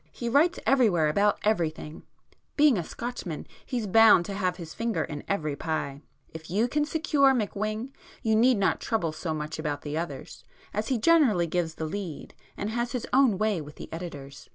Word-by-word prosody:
He 235 - -4
writes 315 +8 +3
everywhere 205 - +3
about 205 +6 +2
everything,—being 200 - -1
a 175 - -1
Scotchman 210 -6 -6 0.2
he's 240 -4 -3
bound 215 -3 +6
to 200 - -5
have 185 -2 -1
his 165 -3 -8
finger 230 -1 -1
in 145 -1 -6
every 155 -7 -1
pie. 145 -3 -3 0.3
If 160 0 -9
you 210 +7 +1
can 295 +4 0
secure 295 -4 +3
McWhing, 215 +2 -2 0.3
you 220 -2 +2
need 240 +2 +4
not 195 - +1
trouble 180 -9 -1
so 160 +1 -4
much 155 +1 -5
about 145 -2 -3
the 150 +1 -3
others, 145 -6 -7 0.3
as 210 +1 -2
he 260 - +1
generally 235 - +4
gives 165 -1 -2
the 160 - -4
'lead,' 170 -2 -6 0.2
and 205 +2 -3
has 240 +2 -2
his 250 - -2
own 255 -6 +4
way 215 -4 0
with 150 0 -11
the - - -10
editors. 145 -5 -8
200 Hz, 180 wpm, -27 LUFS, 160-235 Hz, 0.3 s, bound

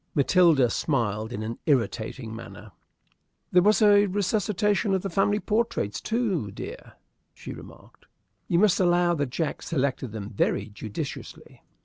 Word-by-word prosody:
Matilda 150 -4 +4
smiled 110 -6 -1
in 110 -3 -4
an 115 +2 -5
irritating 115 -3 -1
manner. 115 - -10 0.8
"There 180 - +5
was 210 +3 +4
a 205 0 +6
resuscitation 205 +1 0
of 190 - -2
the 195 - -3
family 205 +3 +2
portraits, 215 - -1
too, 205 - -1
dear," 100 - -9 0.4
she - - -8
remarked. - - -15 0.4
"You 170 - +1
must 200 0 +4
allow 175 -1 +3
that 145 -5 -1
Jack 155 +5 -3
selected 130 -5 -2
them 105 -1 -7
very 105 - 0
judiciously." 105 0 -8
165 Hz, 135 wpm, -26 LUFS, -, 0.8 s, a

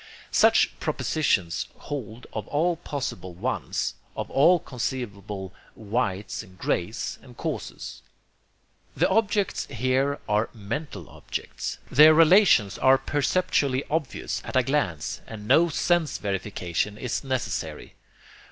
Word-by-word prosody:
Such - - +4
propositions 95 - 0
hold 120 -4 -6
of 110 - -4
all 165 +4 +1
possible 125 - -5
'ones,' 90 - -2 0.2
of - - -4
all 170 +6 +6
conceivable 105 - -5 0.2
'whites' 105 -3 -2
and 95 0 -15
'grays' - - -2
and - - -15
'causes.' - - -5 1.0
The - - +4
objects 205 -1 +1
here 130 +3 0
are 105 +2 +1
mental 105 - -5
objects. - - -5
Their 155 +3 +8
relations 165 - +5
are 130 0 +6
perceptually 140 -1 +1
obvious 150 -5 -2
at - - -7
a 130 - +5
glance, 120 - -1
and 105 -2 -8
no 165 +7 +5
sense 165 -1 +1
verification 100 0 -2
is 125 +4 -3
necessary. 130 -2 -3
130 Hz, 115 wpm, -26 LUFS, 105-150 Hz, 1.0 s, Their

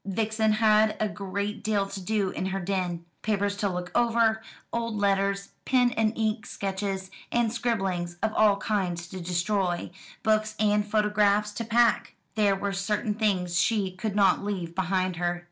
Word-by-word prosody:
Vixen 220 +2 0
had 215 0 +4
a 215 - +1
great 200 +1 -4
deal 205 -2 +1
to 195 0 -7
do 200 -1 0
in 185 - -3
her 190 0 -2
den; 175 -2 -2 0.2
papers 205 -1 0
to 200 0 0
look 180 -1 -4
over, 230 -2 +3 0.3
old 230 -1 -2
letters, 200 -1 +1
pen 250 -2 +3
and 220 -1 0
ink 215 -1 -1
sketches, 195 -1 -3 0.2
and 235 -2 +1
scribblings 190 -8 -1
of 220 -1 +1
all 210 -2 +4
kinds 185 -6 -1
to 185 -1 -7
destroy, 180 +1 -1 0.3
books 215 0 +1
and 210 0 +2
photographs 210 -1 +2
to 220 +3 -4
pack. 235 +1 +2 0.2
There 205 -2 +3
were 200 +1 -2
certain 210 +2 -1
things 185 -5 0
she 205 -3 +1
could 195 +3 -4
not 200 -2 +4
leave 185 -5 -3
behind 185 0 0
her. 175 0 -1
205 Hz, 160 wpm, -27 LUFS, 190-215 Hz, 0.3 s, had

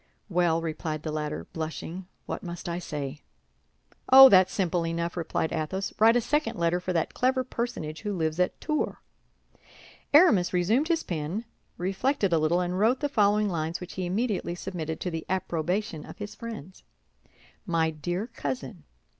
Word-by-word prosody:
"Well," 170 -2 +2
replied 155 -1 -3
the 155 - -3
latter, 150 - -3
blushing, 165 +3 -5 0.2
"what - - -4
must 175 -1 -7
I 170 0 -2
say?" 145 -3 -5 0.9
"Oh, 265 0 +12
that's 185 -3 +6
simple 180 -3 0
enough!" 170 +1 -2
replied 160 -1 -2
Athos. 170 +5 -2
"Write 225 +2 +6
a 245 - +4
second 295 +6 0
letter 170 +1 +1
for 180 +1 -3
that 165 -3 0
clever 255 +1 +1
personage 235 -11 -4
who 210 - -3
lives 160 0 -1
at 180 - +1
Tours." 305 -1 -1 1.2
Aramis 290 - +5
resumed 215 - +2
his 330 -1 +1
pen, 170 +7 -3 0.3
reflected 195 +3 0
a 165 - +4
little, 165 +3 +2
and 180 +1 -2
wrote 235 +5 +3
the 290 - -1
following 210 -4 +3
lines, 165 -2 -2
which 180 - -8
he 185 -1 -3
immediately 200 -2 -1
submitted 165 -4 -5
to 180 - -2
the 165 -1 -4
approbation 175 -1 -1
of - - -11
his 205 0 -6
friends. 215 -6 -8 0.9
"My 165 -2 +1
dear 175 +6 -3
cousin." 135 - -5
180 Hz, 165 wpm, -27 LUFS, 160-210 Hz, 1.2 s, Oh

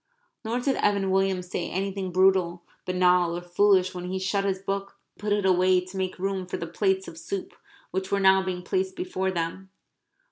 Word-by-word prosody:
Nor 230 +2 -1
did 270 +1 0
Evan 200 -2 +1
Williams 190 -2 +1
say 175 - -2
anything 195 0 -3
brutal, 180 -2 +3 0.2
banal, 180 -1 +3
or - - -5
foolish 185 +1 +3
when 180 -1 -6
he 185 +1 -3
shut 195 +1 0
his 195 -1 0
book 195 +1 -4 0.2
and - - -34
put 210 0 -2
it 205 -1 +1
away 185 0 +4
to 185 +1 -11
make 190 -1 -2
room 190 0 -2
for - - -4
the 170 - -4
plates 190 +3 0
of 165 - -9
soup 195 +2 -5 0.4
which 190 +1 -3
were 200 - +2
now 190 0 +5
being 185 -1 -4
placed 375 - -1
before 355 - -2
them. 185 +2 -3
190 Hz, 200 wpm, -26 LUFS, 180-195 Hz, 0.4 s, now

